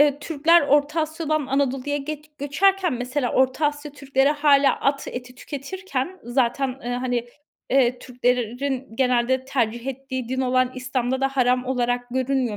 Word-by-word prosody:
Iıı, 290 -1 +4
Türkler 320 +2 +4
Orta 290 +3 +2
Asya'dan 310 -2 -1
Anadolu'ya 270 +1 0
get 300 +1 -7
göçerken 360 +6 +2
mesela 250 +1 -2
Orta 260 +3 +2
Asya 290 0 -4
Türkleri 275 -1 +1
hâlâ 290 -2 +3
at 275 0 0
eti 250 0 -7
tüketirken 295 +4 -5
zaten, 250 +2 +1
ııı, 245 -1 -4
hani, 245 -1 -2 0.4
eee, 250 -2 +3
Türklerin 250 +1 -2
genelde 255 0 +2
tercih 240 -2 -1
ettiği 260 -2 -4
din 260 +1 -1
olan 255 0 +2
İslam'da 255 0 -2
da 270 - +2
haram 255 -2 +1
olarak 245 -1 0
görünmüyor, 255 -3 0
265 Hz, 145 wpm, -23 LUFS, 250-290 Hz, 0.4 s, Iıı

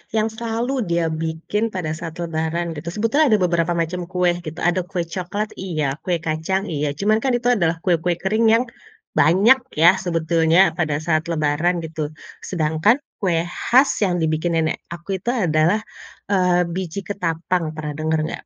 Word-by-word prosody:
yang 220 0 +1
selalu 230 +2 -3 0.2
dia 170 -1 +1
bikin 160 +7 -2
pada 170 -4 -2
saat 160 0 -6
Lebaran 165 +1 -2
gitu, 160 +1 -8
sebetulnya 255 +8 +2
ada - - +1
beberapa 170 -1 +1
macam 170 +1 -2
kue 180 -1 +1 0.2
gitu, 155 - -6
ada 175 +2 +2
kue 175 -3 -2
coklat 185 +5 -4
iya, 155 -7 -1 0.2
kue 180 - +2
kacang 160 +5 -1
iya, 150 -1 -1
cuman 215 +6 +2
kan 255 +1 +1
itu 245 +1 +1
adalah 170 -8 +2
kue-kue 175 -1 +1
kering 215 +6 0
yang 230 - +4 0.6
banyak 205 +11 +5 0.2
ya, 165 +3 +7
sebetulnya 165 0 +3
pada 155 -4 -1
saat 155 -1 +1
Lebaran 155 +3 +1
gitu. 155 -1 -5 0.2
Sedangkan 160 +5 +1 0.2
kue 170 -5 +1
khas 255 +10 +3
yang 180 -3 +1
dibikinin 160 0 +1
nenek - - -4
aku 175 +3 -5
itu 210 - -25
adalah, 175 0 +2 0.5
eee, 180 -2 +3
biji 185 +1 -4
ketapang, 170 -4 -2
pernah 155 -1 -4
denger 160 0 0
nggak? - - -5
175 Hz, 165 wpm, -21 LUFS, 160-195 Hz, 0.6 s, ya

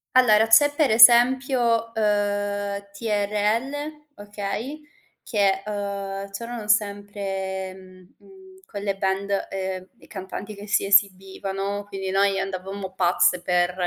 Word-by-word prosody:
Allora, 220 -4 +5
c'è 255 +6 +5
per 295 -5 +2
esempio, 240 0 +5
uhm, 205 -1 -1
TRL, 210 +4 -1 0.5
okay, 205 +7 -5 0.4
che, 195 -3 +1
ehm, 200 -1 -5
c'erano 230 +2 -7
sempre, 200 -2 -2
mhmm, 185 -1 -17
mhmm, 380 -1 -18
quelle 200 - -4
band, 195 +1 -1
ehm, 190 -1 -5
e - - -19
cantanti 200 +1 -8
che 205 0 -11
si 205 - +1
esibivano, 195 0 0
quindi 195 -2 -5
noi 195 0 +2
andavamo 195 0 -5
pazze 180 -1 +2
per, 180 0 +1
200 Hz, 115 wpm, -23 LUFS, 195-215 Hz, 0.5 s, Allora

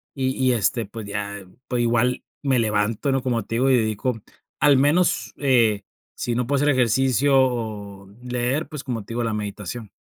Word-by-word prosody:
Y 130 -2 0
y 130 -1 +3
este 115 +1 0
pues 110 +2 -8
ya, 100 -1 -5 0.2
pues 125 -1 0
igual 120 +1 +1 0.2
me 135 -3 +2
levanto, 110 +4 0
¿no? 135 0 +1
Como 120 -3 0
te 115 - -4
digo, 130 +3 +2
y 130 - +5
dedico, 110 +1 -1 0.4
al 145 -2 +6
menos, 150 +6 +2
eh, 115 -7 +3 0.3
si 120 - -2
no 125 0 -1
puedo 140 +1 +1
hacer 145 - +3
ejercicio 130 +2 +2
o 105 -6 -2 0.2
leer, 125 +5 -1
pues, 150 -4 -6
como 120 -5 -4
te 115 - -9
digo, 120 +1 -1
la 115 - -1
meditación. 105 +1 -5
120 Hz, 185 wpm, -23 LUFS, 110-130 Hz, 0.4 s, al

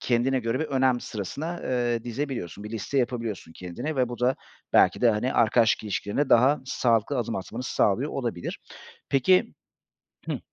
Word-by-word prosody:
kendine 125 +2 +1
göre 115 +3 -1
bir - - 0
önem 130 -4 +2
sırasına, 145 - -5
ııı, 120 -2 -1
dizebiliyorsun, 120 - -4
bir 105 - -7
liste 115 +5 -2
yapabiliyorsun 115 -8 -2
kendine 120 - -5
ve 125 -2 +2
bu 120 - -6
da 125 +2 +2 0.4
belki - - +5
de, 120 - +5
hani, 110 +4 0
arkadaşlık 115 -1 +3
ilişkilerine 105 +6 -1
daha 130 +5 +5
sağlıklı 120 +1 +1
adım 115 -1 -2
atmanı 115 +6 -5
sağlıyor 125 +3 +1
olabilir. 120 -10 -4 0.5
Peki 185 - +3 0.7
Hıh. - - -3
120 Hz, 155 wpm, -26 LUFS, 110-135 Hz, 0.7 s, belki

